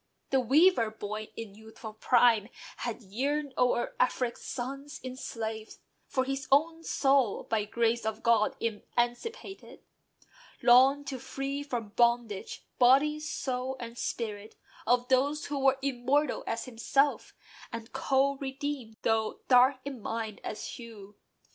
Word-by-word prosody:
The 270 - +4
"weaver 270 0 +4
boy," 215 0 -6
in 225 -3 -7
youthful 220 +1 -11
prime, 230 -1 +3 0.3
had 235 0 -5
yearned 275 +8 -2
O'er 245 -1 +1
Afric's 250 -1 0
sons 275 +3 -6
enslaved; 225 -4 -6 0.3
for 260 - 0
his 270 +1 -3
own 325 +4 +3
soul, 270 -8 +2
By 215 -2 -1
"grace 235 +2 0
of 220 +1 -3
God" 230 -2 +3
emancipated, 240 - -3 0.8
longed 265 +4 +6
To 270 -2 -5
free 275 +3 -4
from 245 -7 -4
bondage 235 -2 0
"body, 275 +5 +5
soul, 265 -3 -3
and 235 -1 -7
spirit" 215 -3 -4 0.3
Of 245 +1 +3
those 280 +3 +2
who 285 -1 -3
were 270 0 +3
immortal 275 +3 0
as 230 - -2
himself, 270 +4 0 0.4
And 230 +1 -7
co 270 +1 +1
redeemed, 270 -4 -5
though 220 -1 0
dark 255 +1 +5
in 270 -5 -6
mind 220 -1 -4
as 215 - -5
hue. 215 -4 -10
245 Hz, 130 wpm, -29 LUFS, 225-275 Hz, 0.8 s, longed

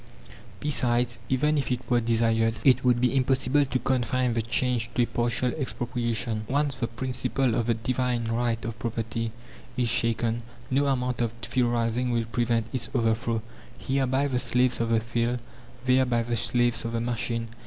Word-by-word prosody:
Besides, 120 -4 +1
even 150 +3 +2
if 135 - -2
it 125 0 -2
were 120 -1 +3
desired, 115 -1 +2
it 130 -2 +5
would 125 -1 +3
be 125 +2 +2
impossible 130 +2 +2
to 130 -1 -1
confine 125 -1 0
the 115 - +1
change 120 +1 0
to 125 - +3
a - - +2
partial 120 +1 0
expropriation. 120 -5 -2
Once 140 +1 +1
the 125 -2 -2
principle 125 +1 -1
of 115 0 0
the 115 - +2
"Divine 120 +1 -1
Right 115 0 -1
of 115 0 -5
Property" 115 0 -3 0.5
is 125 -2 +2
shaken, 115 0 +1 0.3
no 140 +2 +2
amount 125 -2 0
of 115 -2 0
theorizing 120 0 0
will 115 -1 0
prevent 115 -1 0
its 130 -3 -2
overthrow, 115 -1 +1 0.3
here 135 0 0
by 135 +2 +1
the 130 -3 0
slaves 125 -1 +2
of 115 - 0
the 115 -1 +3
field, 120 +1 -1 0.5
there 130 0 +4
by 120 -1 +1
the 120 +1 -2
slaves 120 +1 +1
of 115 0 -4
the 115 - 0
machine. 115 -1 -2
120 Hz, 175 wpm, -26 LUFS, 115-125 Hz, 0.5 s, it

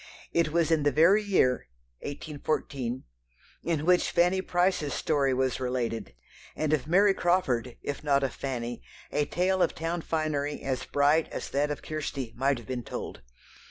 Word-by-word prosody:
It 165 -2 +2
was 165 0 +2
in 160 -2 +3
the 145 0 +3
very 170 +9 +5
year 185 - +2 0.3
(1814) 140 -4 -3 0.6
in 160 -3 -1
which 180 0 +4
Fanny 180 +2 +3
Price's 175 -6 +1
story 140 -4 +1
was 130 0 0
related, 125 - -2 0.4
and 155 -1 0
of 145 -2 0
Mary 195 +4 +5
Crawford, 130 -11 0
if 145 +1 -4
not 140 -2 +3
of 135 - -1
Fanny, 120 -3 -4 0.3
a 150 - +1
tale 185 +3 +1
of - - +2
town 165 +1 -2
finery 150 -3 -2
as 130 -1 -2
bright 145 +3 +3
as - - -6
that 145 +2 +1
of 150 - -4
Kirstie 140 -6 -4
might 135 +2 +1
have 120 - -10
been 130 -2 -3
told. - - -6
145 Hz, 160 wpm, -28 LUFS, 130-170 Hz, 0.6 s, very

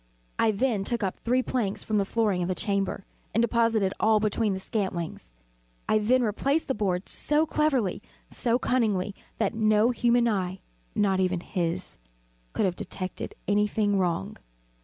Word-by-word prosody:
I 225 - +4
then 215 -1 +1
took 235 +2 -1
up 190 - -1
three 250 +2 +1
planks 220 -7 -1
from 215 -1 0
the 200 - +1
flooring 205 -4 +1
of 175 - -1
the 185 - -1
chamber, 195 0 -1 0.3
and 230 - +4
deposited 230 -4 +2
all 220 0 +4
between 210 -1 0
the - - -4
scantlings. 185 - -3 0.6
I 215 - +3
then 245 +4 +3
replaced 275 +8 0
the 265 - +1
boards 190 -4 -1
so 300 +2 +1
cleverly, 275 - +1 0.3
so 235 -1 0
cunningly, 210 -7 0 0.2
that 215 -3 0
no 215 +1 +3
human 240 0 +3
eye 190 -4 -1 0.4
not 195 -2 +2
even 185 -1 +1
his 175 - -3 0.5
could - - +1
have 180 -2 0
detected 185 +1 -5
any 205 +1 +3
thing 205 -1 +1
wrong. 175 - -1
210 Hz, 160 wpm, -27 LUFS, 190-235 Hz, 0.6 s, I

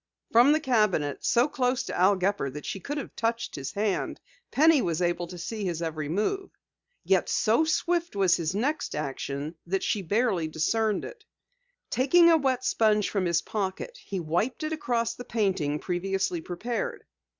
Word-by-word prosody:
From 240 +5 +6
the 310 - +4
cabinet, 210 - +1
so 240 +3 +3
close 255 -3 0
to - - -5
Al 190 +3 +4
Gepper 190 -6 0
that 150 +3 -8
she 195 - -4
could 290 +10 -5
have 285 - -6
touched 230 0 -1
his 135 -1 -5
hand, 205 -2 -1 0.3
Penny 310 -1 +5
was 165 -6 -1
able 175 0 0
to 180 +1 -9
see 210 +5 -5
his 175 -4 -2
every 155 -3 -3
move. 300 - -1 0.5
Yet - - +2
so 230 +9 +3
swift 345 - 0
was 190 -3 +4
his 170 +1 -2
next 280 +7 -1
action, 140 +1 -4
that 195 +2 -1
she 210 - 0
barely 200 -3 +1
discerned 210 +7 0
it. 460 -3 -10 0.7
Taking 335 +7 +5
a 325 - +6
wet 260 -3 0
sponge 215 -4 +2
from 195 -3 0
his 170 -1 +1
pocket 210 - -4
he 195 - -4
wiped 175 - -1
it 310 +1 -2
across 240 -6 -1
the 245 - -9
painting 190 -11 0
previously 185 +1 -2
prepared. 245 - -4
205 Hz, 170 wpm, -27 LUFS, 175-255 Hz, 0.7 s, From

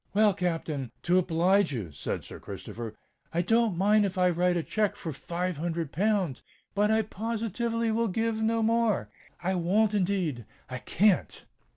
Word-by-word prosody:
"Well, 210 -1 +5
Captain—to 165 -1 -1
oblige 180 +1 +3
you," 105 - -4
said 70 - -4
Sir - - -10
Christopher, 115 -2 -7 0.4
"I 170 +1 +1
don't 225 -1 +2
mind 210 +3 +4
if 190 -2 -2
I 180 -1 +4
write 175 +1 +2
a 165 - -1
cheque 210 +2 0
for 160 - -5
five 175 +4 -3
hundred 165 -1 -2
pounds; 190 - 0 0.3
but 205 +1 +2
I 220 0 +3
positively 230 +2 -2
will 230 +1 +1
give 225 +2 -1
no 225 0 +1
more—I 210 - -1
won't 195 +5 +2
indeed—I 155 - -2
can't." 195 - +1
185 Hz, 150 wpm, -28 LUFS, 165-220 Hz, 0.4 s, Well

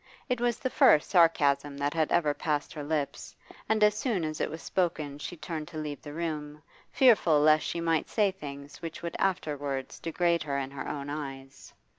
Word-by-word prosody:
It 250 -1 0
was 240 -1 +1
the 260 0 -3
first 150 - +5
sarcasm 145 -5 +3
that 145 +1 -1
had 160 -2 0
ever 150 -4 +3
passed 150 +1 -2
her 150 -3 -6
lips, 145 -1 -3 0.3
and 220 -1 +3
as 210 0 +6
soon 210 -5 -1
as 155 0 -4
it - - 0
was 160 +2 -6
spoken 155 -6 -1
she 175 - -6
turned 155 -1 -5
to 155 - -9
leave 150 -2 -5
the 145 - -9
room, 155 -2 -4 0.3
fearful 210 - +5
lest 155 +1 +5
she 170 - -3
might 165 -1 0
say 210 -3 +2
things 145 -5 -9
which 165 0 -7
would 170 - -4
afterwards 145 -7 -2
degrade 170 0 +1
her 140 -2 -2
in 135 -1 -3
her 140 - -6
own 145 -1 -4
eyes. 135 -2 -7
155 Hz, 195 wpm, -29 LUFS, 145-170 Hz, 0.3 s, as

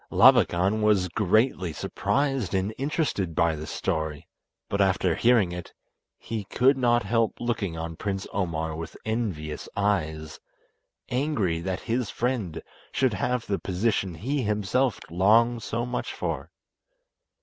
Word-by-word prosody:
Labakan 95 +5 +5
was 105 -4 +3
greatly 100 0 +2
surprised 135 - -1
and 95 +3 0
interested 135 - -1
by 85 -1 +2
this 75 0 -7
story, 80 -2 -2 0.4
but 100 - 0
after 95 -2 +2
hearing 115 -3 +3
it 90 -1 -7 0.4
he 110 -2 -4
could 130 +7 +3
not 120 -2 +2
help 115 +2 0
looking 105 -8 -2
on 80 0 -4
Prince 95 +1 -3
Omar 80 -4 -1
with 80 0 -7
envious 95 -10 -3
eyes, 80 -7 -1 0.7
angry 125 - 0
that 90 +2 -3
his 120 -1 -1
friend 115 -10 -2 0.3
should 130 -4 +1
have 125 +5 -1
the 100 - -1
position 95 -1 -1
he 135 - -1
himself 105 +3 +1
longed 115 +6 +4
so 115 +1 -2
much 125 0 -3
for. - - -4
100 Hz, 130 wpm, -26 LUFS, 85-120 Hz, 0.7 s, Labakan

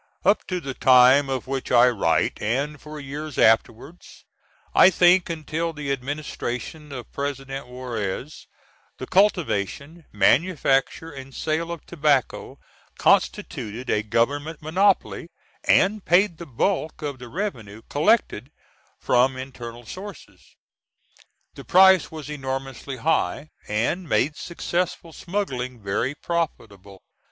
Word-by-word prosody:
Up 205 - +3
to 180 -1 -2
the 140 -5 -6
time 130 +2 +5
of 130 -2 -2
which 135 0 -4
I 125 0 +6
write, 100 -9 +1
and 140 +7 -2
for 150 0 -9
years 145 +2 -7
afterwards 115 +8 0 0.5
I - - +8
think 180 0 +4
until 165 +1 -3
the 150 -2 -4
administration 145 +1 -5
of 125 -3 -8
President 135 -1 -5
Juarez 125 - -5 0.5
the - - -6
cultivation, 165 - 0
manufacture 135 - +2
and 135 -1 -10
sale 160 +2 -2
of 170 -3 -7
tobacco 145 -7 0 0.4
constituted 115 +5 0
a 105 - +2
government 140 +9 -1
monopoly, 180 +1 +1 0.4
and 200 +1 +3
paid 175 -1 +3
the 170 - -8
bulk 155 +4 -1
of 140 -3 -4
the 125 -1 -10
revenue 115 - -5
collected 145 - +1 0.5
from 130 +1 +2
internal 120 -3 -8
sources. 195 - -11 1.0
The - - -11
price 190 -2 +6
was 155 -2 -8
enormously 135 -2 -5
high, 155 +2 -1 0.2
and 120 - -1
made 150 +1 +1
successful 170 -1 -3
smuggling 130 - -4
very 110 +7 -2
profitable. 105 - -5
140 Hz, 115 wpm, -24 LUFS, 125-170 Hz, 1.0 s, I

